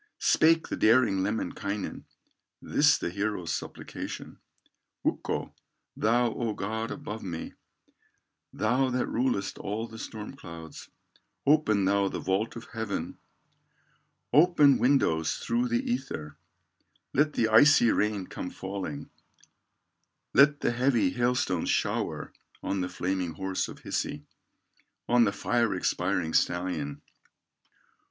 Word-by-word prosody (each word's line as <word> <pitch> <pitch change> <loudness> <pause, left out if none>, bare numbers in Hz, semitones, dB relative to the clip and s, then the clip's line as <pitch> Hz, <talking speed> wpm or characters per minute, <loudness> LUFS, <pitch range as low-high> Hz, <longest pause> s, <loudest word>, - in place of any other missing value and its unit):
Spake 165 +1 +4
the - - -2
daring 110 -4 +4
Lemminkainen, 100 0 -3 0.5
This - - +3
the 85 - -3
hero's 100 -3 -2
supplication: - - -6 0.7
"Ukko, - - -2 0.4
thou 120 +1 +2
O 115 -3 -2
God 110 +3 -3
above 110 +1 -6
me, 85 -4 -6 1.0
Thou 125 +4 +1
that 125 0 0
rulest 115 -6 -1
all 105 +3 -3
the 110 0 -11
storm 110 +4 -7
clouds, 85 - -10 0.6
Open 125 -10 +3
thou 100 0 +2
the - - -4
vault 95 +4 -1
of 115 - -8
heaven, 110 -3 -4 1.1
Open 150 -2 +6
windows 80 - +2
through 120 +1 0
the 120 0 -1
ether, 120 - -3 0.8
Let 150 +2 +2
the 110 - +2
icy 120 0 +6
rain 105 -2 0
come 90 - -6
falling, 95 -7 -6 1.2
Lot 145 +3 +5
the - - +2
heavy 125 +1 +2
hailstones 120 -8 0
shower - - -1 0.3
On 95 -1 -1
the 90 - -2
flaming 90 -2 -2
horse 95 +4 -2
of - - -11
Hisi, - - -3 0.8
On 120 -1 +5
the 100 - +1
fire 115 0 0
expiring 80 -2 -1
stallion." 90 -5 0
110 Hz, 115 wpm, -28 LUFS, 95-125 Hz, 1.2 s, Open